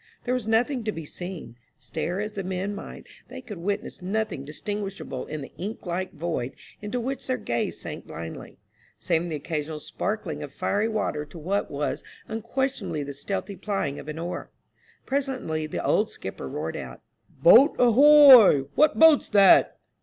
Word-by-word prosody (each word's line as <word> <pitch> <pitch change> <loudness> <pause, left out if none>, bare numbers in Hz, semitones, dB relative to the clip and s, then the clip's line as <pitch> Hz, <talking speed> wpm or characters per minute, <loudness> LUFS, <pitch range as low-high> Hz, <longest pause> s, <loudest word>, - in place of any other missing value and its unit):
There 250 - -1
was 250 -4 -2
nothing 240 +3 +1
to 215 - 0
be 165 -5 -7
seen; 175 -8 -8 0.2
stare 180 +2 -4
as 210 +1 -4
the 195 - -4
men 190 +2 -3
might, 200 - -9 0.2
they - - -9
could 225 -8 -9
witness 200 +2 -3
nothing 200 -5 -2
distinguishable 195 -1 -5
in 155 -1 -5
the 135 - -9
ink 205 +5 -6
like 185 +1 -3
void 160 -6 -3 0.3
into 210 +4 -3
which 265 +3 -4
their 255 -1 0
gaze 120 0 -2
sank - - -7
blindly, 80 +1 -8 0.4
saving 170 +2 -1
the 160 - -3
occasional 150 0 -4
sparkling 185 -3 -4
of 145 -2 -7
fiery 205 +2 0
water 210 -9 -2
to 150 +3 -13
what 190 +6 -2
was 145 +1 -3 0.2
unquestionably 235 - -2
the 140 0 -6
stealthy 195 +7 -4
plying 185 -7 -3
of - - -10
an 155 +1 -5
oar. 170 +2 -5 0.6
Presently 260 - -2
the - - -4
old - - +2
skipper 65 - -7
roared 80 +4 -4
out, 65 -2 -8 0.3
"Boat, 230 - +6
ahoy! 255 - +8
what 305 +1 +3
boat's 320 -2 +6
that?" 200 -2 +6
195 Hz, 165 wpm, -25 LUFS, 155-225 Hz, 0.6 s, ahoy